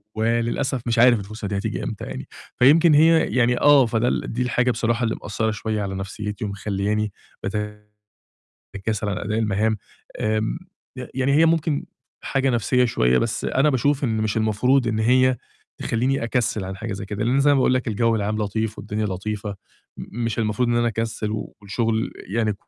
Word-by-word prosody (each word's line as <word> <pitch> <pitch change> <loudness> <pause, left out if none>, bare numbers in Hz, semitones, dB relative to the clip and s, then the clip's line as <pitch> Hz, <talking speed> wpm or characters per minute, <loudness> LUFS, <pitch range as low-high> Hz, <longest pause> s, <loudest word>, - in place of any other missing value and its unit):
وللأسف 115 +4 0
مش 115 0 +1
عارف 120 -1 +6
الفرصة 105 +1 -7
دي 100 0 -2
هتيجي - - -3
إمتى - - -5
يعني. 65 - -7 0.3
فيمكن 155 +6 +6
هي 160 +2 +6 0.2
يعني 125 0 +3
آه 145 -3 +7
فده 115 +1 0
ال - - -1
دي 125 - -2
الحاجة 125 0 +1
بصراحة 115 +1 0
اللي 115 - 0
مأثّرة 110 +2 -1
شوية 105 0 -3
على 95 -1 -3
نفسيتي 105 +3 -5
ومخلّياني 105 +1 -2 0.3
باتكاسل 105 +1 -6 1.0
عن 100 - -2
أداء 105 +1 -2
المهام 110 0 +1 0.4
آمم. 110 +6 0 0.4
ي 125 - -5
يعني 130 +1 +1
هي 160 +3 +5
ممكن 160 -2 +1 0.4
حاجة 135 0 0
نفْسية 125 +1 +2
شوية، 65 - +2
بس - - -1
أنا 140 +3 +2
باشوف 140 +2 +1
إن 115 -3 0
مش 110 -1 -1
المفروض 115 +4 +2
إن 110 -1 -1
هي 130 +3 +4 0.4
تخلّيني 125 +3 0
أكسِّل 115 -3 0
عن 95 +1 -6
حاجة 110 +2 -5
زي 100 +1 -5
كده، 105 +1 -3
لأن 130 +4 +2
زي 145 +1 +4
ما - - +4
باقول 130 -1 +3
لك 130 -1 -1
الجو 115 +1 +1
العام 105 0 -1
لطيف 110 +1 -2
والدنيا 105 +1 -3
لطيفة 100 +1 -4 0.4
مش 115 -1 -4
المفروض 110 +2 0
إن 120 - +2
أنا 120 0 +2
أكسِّل 115 -1 -3 0.3
والشغل 110 +2 -1 0.2
يعني 110 +1 0
110 Hz, 175 wpm, -23 LUFS, 105-125 Hz, 1.0 s, آه